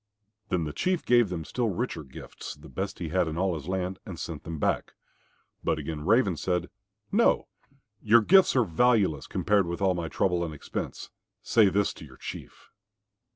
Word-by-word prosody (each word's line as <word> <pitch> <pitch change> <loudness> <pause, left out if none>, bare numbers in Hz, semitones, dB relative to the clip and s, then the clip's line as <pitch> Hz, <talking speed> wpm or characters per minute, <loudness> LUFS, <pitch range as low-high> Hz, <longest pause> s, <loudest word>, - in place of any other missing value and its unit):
Then 90 -2 0
the 75 -2 -4
Chief 185 - 0
gave 120 -4 +4
them 85 -3 -4
still 120 +5 -1
richer 95 -4 -3
gifts, 65 -2 -9
the - - -14
best 95 +1 -4
he 85 - -4
had 90 +1 +1
in 80 0 -4
all 95 0 +1
his 75 -3 -6
land, 95 0 -2
and - - -8
sent - - -6
them 80 -1 -5
back. - - -1 0.7
But 80 - +1
again 75 0 -5
Raven 105 -6 +3
said, 90 +3 -1 0.4
"No, - - +3 0.5
your 115 +2 +6
gifts 190 - +5
are 125 - +5
valueless, 95 - +2
compared 100 -2 +1
with 85 0 -3
my 90 -4 +1
trouble 90 +2 0
and 80 -2 -4
expense. - - -6 0.3
Say 110 -4 +5
this 100 +1 +1
to - - -11
your - - -15
Chief." - - -9
90 Hz, 180 wpm, -28 LUFS, 80-105 Hz, 0.7 s, your